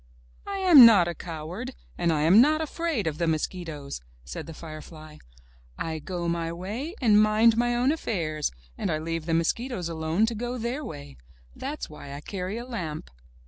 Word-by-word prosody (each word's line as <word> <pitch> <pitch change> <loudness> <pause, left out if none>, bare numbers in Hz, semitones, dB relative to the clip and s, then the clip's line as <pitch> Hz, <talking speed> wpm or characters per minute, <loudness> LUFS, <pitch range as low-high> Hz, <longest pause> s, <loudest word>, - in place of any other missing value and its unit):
"I 400 0 -3
am 355 -9 +9
not 205 -7 +8
a 175 - -2
coward, 170 +11 -6 0.2
and 170 -1 +1
I 150 -2 +1
am 185 +8 +7
not 305 +4 +4
afraid 320 - -2
of 160 0 -2
the 170 - +1
mosquitoes!" 155 - -3 0.2
said 65 - -7
the 165 - -7
firefly. 155 -1 -10 0.6
"I 160 -1 -3
go 175 +2 -4
my 170 -1 -1
way 215 - -5
and 215 -5 +5
mind 215 +2 +5
my 240 +1 +1
own 250 +3 +3
affairs, 165 - -2 0.3
and - - -1
I 155 - +1
leave 165 +1 -4
the 165 - +2
mosquitoes 180 +2 -1
alone 160 +5 +1
to 230 - -2
go 240 +3 -4
their 245 +5 -3
way. 145 - -9 0.4
That's 285 +3 -5
why 145 -2 -10
I 140 - -7
carry 190 +4 -4
a 240 - -6
lamp." 165 - -5
180 Hz, 185 wpm, -26 LUFS, 160-240 Hz, 0.6 s, am